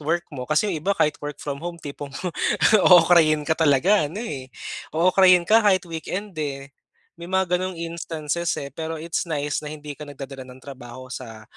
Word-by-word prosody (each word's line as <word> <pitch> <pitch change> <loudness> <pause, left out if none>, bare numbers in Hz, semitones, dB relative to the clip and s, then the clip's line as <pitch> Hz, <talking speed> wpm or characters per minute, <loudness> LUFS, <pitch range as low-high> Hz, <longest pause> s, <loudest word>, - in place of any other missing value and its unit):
work 170 +3 -1
mo, 125 -1 -6
kasi 155 +6 +2
yung 155 - -3
iba 200 +4 0
kahit 150 - +1
work 145 -1 -6
from 140 -1 -5
home 175 +1 -5
tipong 145 -2 -8 0.8
ookrayin 165 -3 +6
ka 150 - -6
talaga 160 +5 +4
ano, 195 +10 -6
eh, 135 - -5 0.5
ookrayin 180 +1 +5
ka 215 +6 +5
kahit 185 -3 +4
weekend, 180 +3 -5
eh. 140 -2 -4 0.5
May 170 - -8
mga 185 -1 +1
gano'ng 185 0 -3
instances, 165 0 -3
eh. 140 - -6
Pero 160 +3 -5
it's 165 +2 -3
nice 150 -3 -2
na 150 - -7
hindi 150 -1 -8
ka 150 - -8
nagdadala 135 -2 -9
ng 130 0 -14
trabaho 130 -2 -10
sa 115 -4 -8
155 Hz, 180 wpm, -23 LUFS, 140-175 Hz, 0.8 s, ookrayin